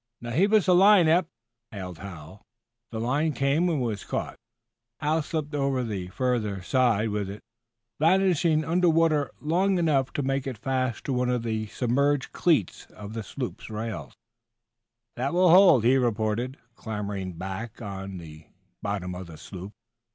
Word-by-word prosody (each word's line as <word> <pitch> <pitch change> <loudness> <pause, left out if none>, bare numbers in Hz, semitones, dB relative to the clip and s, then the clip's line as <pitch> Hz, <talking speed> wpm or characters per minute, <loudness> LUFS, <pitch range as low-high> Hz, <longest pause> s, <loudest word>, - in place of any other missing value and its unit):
"Now, 120 0 -6
heave 190 - +2
us 215 -3 +4
a 180 - +6
line, 190 -1 +6
Eph!" 170 +2 +3 0.4
hailed 90 -5 -7
Hal. 90 0 -10 0.5
The 110 - -5
line 145 +7 0
came, 140 +6 +1
and 160 -4 0
was 115 -5 -2
caught. - - -4 0.6
Hal 155 +1 +1
slipped 150 0 -4
over 135 -3 0
the 100 -6 -4
further 105 -3 -1
side 115 -2 +2
with 105 -2 -2
it, 100 +2 -9 0.6
vanishing 165 -2 +3
under 175 +2 +3
water 160 -3 +2
long 185 +5 +1
enough 145 -6 +1
to 145 - -1
make 135 0 -1
it 130 -4 -4
fast 130 0 -2
to 135 - -2
one 125 0 0
of 125 -2 0
the 110 -1 -2
submerged 140 +5 0
cleats 155 - +1
of 105 0 -8
the 115 - -4
sloop's 125 +4 -6
rail. 110 0 -5 1.1
"That 135 +6 -1
will 180 -1 +5
hold," 180 - +7
he 125 +3 +5
reported, 120 +1 -1 0.2
clambering 105 -5 -5
back 95 +6 -6
on 95 -3 -6
to 85 - -9
the 75 0 -13 0.4
bottom 100 -3 -3
of 90 0 -7
the 80 -2 -11
sloop. 95 +4 -9
125 Hz, 165 wpm, -26 LUFS, 105-155 Hz, 1.1 s, hold